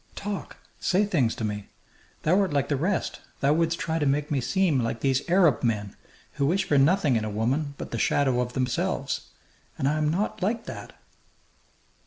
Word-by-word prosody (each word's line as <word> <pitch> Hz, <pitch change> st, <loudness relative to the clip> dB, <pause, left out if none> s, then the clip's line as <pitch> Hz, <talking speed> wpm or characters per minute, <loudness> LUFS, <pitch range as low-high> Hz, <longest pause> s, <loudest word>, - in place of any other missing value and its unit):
Talk! 200 Hz, -1 st, -5 dB, 0.2 s
Say 190 Hz, +2 st, +2 dB
things 140 Hz, -, +1 dB
to -, -, -5 dB
me! 105 Hz, -1 st, -3 dB, 0.6 s
Thou 180 Hz, +5 st, +4 dB
art 195 Hz, -4 st, +1 dB
like 140 Hz, -1 st, 0 dB
the 145 Hz, -, +2 dB
rest; 175 Hz, +8 st, -1 dB, 0.2 s
thou 140 Hz, +2 st, +3 dB
wouldst 165 Hz, +1 st, +1 dB
try 160 Hz, 0 st, -1 dB
to 150 Hz, -, +1 dB
make 145 Hz, +2 st, 0 dB
me 140 Hz, -3 st, +1 dB
seem 160 Hz, +2 st, +2 dB
like 115 Hz, -1 st, -2 dB
these 135 Hz, -1 st, +2 dB
Arab 170 Hz, -8 st, +4 dB
men, 105 Hz, -4 st, -1 dB, 0.4 s
who 140 Hz, -2 st, 0 dB
wish 190 Hz, +5 st, +2 dB
for 145 Hz, -, +4 dB
nothing 150 Hz, -3 st, +3 dB
in 110 Hz, -, -1 dB
a 110 Hz, -, -2 dB
woman 135 Hz, +8 st, -1 dB
but -, -, -7 dB
the 115 Hz, -, -2 dB
shadow 130 Hz, +1 st, +2 dB
of 125 Hz, 0 st, -3 dB
themselves. 130 Hz, -2 st, -1 dB, 0.5 s
And 135 Hz, -, 0 dB
I 150 Hz, +2 st, +1 dB
am 150 Hz, -1 st, +1 dB
not 195 Hz, +7 st, -1 dB
like 225 Hz, +5 st, -1 dB
that!" -, -, -8 dB
145 Hz, 195 wpm, -26 LUFS, 125-175 Hz, 0.6 s, Thou